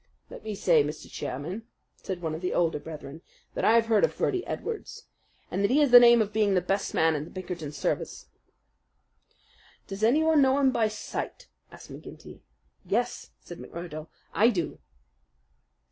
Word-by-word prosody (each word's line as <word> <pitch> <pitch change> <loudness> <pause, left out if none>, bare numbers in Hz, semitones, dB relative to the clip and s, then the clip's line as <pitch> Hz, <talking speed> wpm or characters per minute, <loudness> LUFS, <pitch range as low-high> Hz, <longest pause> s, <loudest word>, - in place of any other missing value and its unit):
"Let - - -10
me 215 -1 -4
say, 165 -6 +4
Mr. 150 +1 -6
Chairman," 175 - -5 0.3
said 180 -2 -6
one 160 -1 -2
of 160 - -5
the 180 - -2
older 165 -3 +1
brethren, 155 0 -9 0.3
"that - - -3
I 220 - +5
have 230 0 +4
heard 220 -2 +3
of - - +1
Birdy 370 -1 0
Edwards, 455 -2 -5 0.5
and 195 +2 -1
that 200 - +3
he 265 - +3
has 290 -4 +4
the 245 - +12
name 235 -1 +7
of 210 0 -9
being 210 -2 +2
the - - +4
best 195 +3 -2
man 160 0 +3
in 150 -1 -2
the 155 - -11
Pinkerton 180 -5 -6
service." - - -3 1.6
"Does 195 +1 -7
anyone 305 +7 +4
know 265 0 +4
him 270 -2 +4
by 225 -3 +2
sight?" 215 - -6 0.2
asked - - -13
McGinty. - - -11 0.4
"Yes," - - -2
said - - -10
McMurdo, 165 -2 -8 0.3
"I 225 +3 +5
do." 175 -9 -3
195 Hz, 175 wpm, -27 LUFS, 165-235 Hz, 1.6 s, the